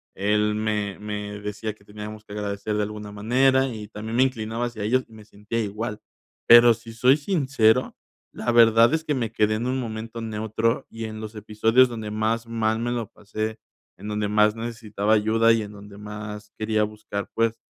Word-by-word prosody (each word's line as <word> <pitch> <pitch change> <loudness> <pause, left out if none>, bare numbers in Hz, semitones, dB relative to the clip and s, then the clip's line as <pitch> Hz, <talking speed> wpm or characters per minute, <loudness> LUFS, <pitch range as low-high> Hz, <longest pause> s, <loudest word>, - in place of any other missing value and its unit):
él 105 +2 +1
me 105 -2 -1
me 105 -1 -5
decía: 105 +1 -4
"Que 100 - -25
teníamos 105 +1 -9
que 105 - -10
agradecer 105 0 -3
de 105 - +1
alguna 105 0 -6
manera", 130 +6 +3
y 110 -4 -6
también 110 +1 -6
me 130 - +5
inclinaba 115 -2 -2
hacia 120 -3 -5
ellos 125 +5 +2
y 115 - -19
me 110 -1 -12
sentía 105 +2 -5
igual. 105 +1 -4 0.5
Pero 120 0 +9
si 115 0 -11
soy 125 +4 +5
sincero, 135 - +2 0.4
la 120 - -2
verdad 115 0 +6
es 160 0 0
que 150 - -1
me 120 -5 -2
quedé 110 0 +2
en 120 +3 -2
un 130 +1 0
momento 115 -1 -5
neutro 110 +1 -1
y 115 0 -6
en 110 0 -6
los 110 0 -7
episodios 110 +4 +3
donde 110 -3 -5
más 110 +2 -1
mal 110 -1 0
me 120 +1 -1
lo 120 -3 -2
pasé, 110 +2 -5 0.4
en 100 - -9
donde 105 -1 -1
más 105 +1 +4
necesitaba 115 -2 -2
ayuda 110 +2 +4
y 115 - +1
en 105 - -7
donde 100 0 -12
más 105 0 -8
quería 110 0 +1
buscar, 105 -1 -5
pues, 115 0 0
110 Hz, 195 wpm, -24 LUFS, 105-115 Hz, 0.5 s, Pero